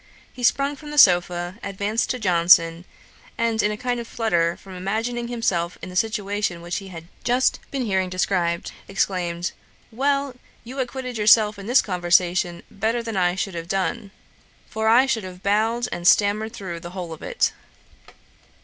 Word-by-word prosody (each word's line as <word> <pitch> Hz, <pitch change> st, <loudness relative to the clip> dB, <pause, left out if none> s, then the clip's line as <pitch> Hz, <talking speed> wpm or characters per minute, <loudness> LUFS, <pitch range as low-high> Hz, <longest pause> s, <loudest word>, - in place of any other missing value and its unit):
He 255 Hz, -, -10 dB
sprung 275 Hz, +4 st, +2 dB
from 300 Hz, +1 st, -11 dB
the 295 Hz, -, -6 dB
sopha, 175 Hz, -3 st, +4 dB
advanced 200 Hz, +3 st, -2 dB
to 255 Hz, -, -1 dB
Johnson, 170 Hz, -4 st, +4 dB, 0.5 s
and 230 Hz, -1 st, +1 dB
in 210 Hz, -, +2 dB
a 210 Hz, -, -3 dB
kind 245 Hz, +1 st, -2 dB
of 235 Hz, -, -6 dB
flutter, 170 Hz, -9 st, 0 dB
from 195 Hz, -, -13 dB
imagining 225 Hz, +6 st, -2 dB
himself 190 Hz, -8 st, -1 dB
in 185 Hz, -, -8 dB
the 180 Hz, -, -10 dB
situation 205 Hz, -4 st, -1 dB
which 175 Hz, 0 st, -3 dB
he 195 Hz, -, -7 dB
had 165 Hz, -3 st, -10 dB, 0.2 s
just 250 Hz, +1 st, +2 dB
been 270 Hz, -3 st, -2 dB
hearing 190 Hz, -3 st, 0 dB
described, 180 Hz, -2 st, -1 dB, 0.2 s
exclaimed, 180 Hz, -3 st, -1 dB, 0.4 s
'Well, 275 Hz, +2 st, 0 dB, 0.3 s
you 255 Hz, +4 st, -8 dB
acquitted 255 Hz, -2 st, -4 dB
yourself 210 Hz, -1 st, +5 dB
in 200 Hz, -, -8 dB
this 245 Hz, +3 st, +4 dB
conversation 175 Hz, -1 st, +1 dB
better 225 Hz, +3 st, -1 dB
than 225 Hz, -2 st, -5 dB
I 180 Hz, -1 st, +2 dB
should 195 Hz, 0 st, -3 dB
have 170 Hz, -1 st, -6 dB
done; 195 Hz, +2 st, -2 dB, 0.6 s
for 220 Hz, 0 st, -2 dB
I 240 Hz, +4 st, +6 dB
should 230 Hz, -5 st, -1 dB
have 185 Hz, 0 st, -10 dB
bowed 225 Hz, +4 st, +1 dB
and 175 Hz, 0 st, -2 dB
stammered 210 Hz, +2 st, +3 dB
through 175 Hz, -4 st, -6 dB
the 170 Hz, -, -8 dB
whole 175 Hz, -3 st, -5 dB
of 160 Hz, -, -12 dB
it.' -, -, 0 dB
200 Hz, 170 wpm, -23 LUFS, 180-230 Hz, 0.6 s, I